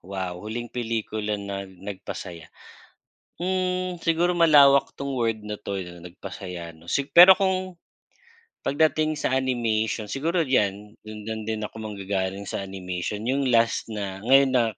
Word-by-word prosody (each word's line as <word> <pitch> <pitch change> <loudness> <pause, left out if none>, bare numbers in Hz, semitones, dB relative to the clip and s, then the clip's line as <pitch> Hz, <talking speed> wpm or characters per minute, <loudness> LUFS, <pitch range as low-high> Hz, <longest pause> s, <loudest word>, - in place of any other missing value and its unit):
wow, 95 -1 -5
huling 115 +3 -6
pelikula 110 -3 -2
na 100 -1 -6
nagpasaya. 95 -3 -8 0.9
Hmm, 185 -1 -1
siguro 175 +1 +2
malawak 145 -4 +6
'tong 140 0 -5
word 115 -2 0
na 105 0 -6
'to 100 -2 -4
na 90 -1 -9
nagpasaya 90 -1 -8
'no. 80 - -19
Si 140 +10 -1
pero 180 +2 +10
kung 185 -1 -1 0.9
pagdating 155 +1 +1
sa 130 - -1
animation 115 -4 0
siguro 165 +4 0
'yan 105 -5 0
do'n 110 +1 -6
din 110 -1 -2
ako 110 - -7
manggagaling 100 -1 -3
sa - - -4
animation. 95 +2 -5
Yung 135 +2 0
last 115 -1 +2
na 100 -3 -5
ngayon 135 0 +6
na 120 - +4
110 Hz, 140 wpm, -25 LUFS, 100-140 Hz, 0.9 s, pero